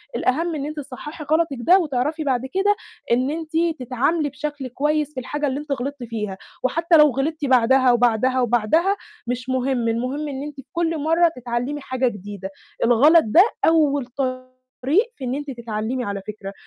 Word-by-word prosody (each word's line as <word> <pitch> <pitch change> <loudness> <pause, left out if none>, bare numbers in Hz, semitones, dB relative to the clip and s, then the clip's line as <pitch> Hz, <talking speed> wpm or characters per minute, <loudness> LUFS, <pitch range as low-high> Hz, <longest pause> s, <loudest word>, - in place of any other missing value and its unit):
الأهَم 325 +5 0
إن 285 -1 -3
أنتِ 305 +1 -6
تصحّحي 295 +3 -8
غلطِك 315 -4 +2
ده 365 +10 +6
وتعرفي 300 0 -1
بعد 255 -4 0
كده 405 +2 +3 0.4
إن 255 +3 +2
أنتِ 320 0 -5 0.3
تتعاملي 275 +5 0
بشكل 290 -1 -5
كويس 300 +3 -1
في 260 - -4
الحاجة 290 +3 -2
اللي 270 +2 -2
أنتِ 295 -1 -8
غلطتِ 275 0 -3
فيها، 210 -4 -4 0.3
وحتّى 330 +5 +3
لو 300 -1 +7
غلطتِ 290 +4 -2
بعدها 255 0 +4
وبعدها 245 +2 +2
وبعدها 245 - +2 0.3
مش 250 +1 -3
مهم، 255 -2 0
المهم 255 +6 -2
إن 275 0 -5
أنتِ 295 -1 -7
في 270 - -10
كل 330 -1 0
مرّة 330 +2 +3
تتعلِّمي 245 +4 -3
حاجة 260 -1 -1
جديدة، 200 -3 -6 0.4
الغلط 295 +8 +6
ده 270 +12 +6 0.2
أول 290 -5 +3
طريق 255 - -2
في - - -9
إن 250 +2 -2
أنتِ 290 -1 -5
تتعلِّمي 235 +1 -3
على 200 -3 -4
فكرة، 200 -2 -7
265 Hz, 170 wpm, -22 LUFS, 245-300 Hz, 0.4 s, لو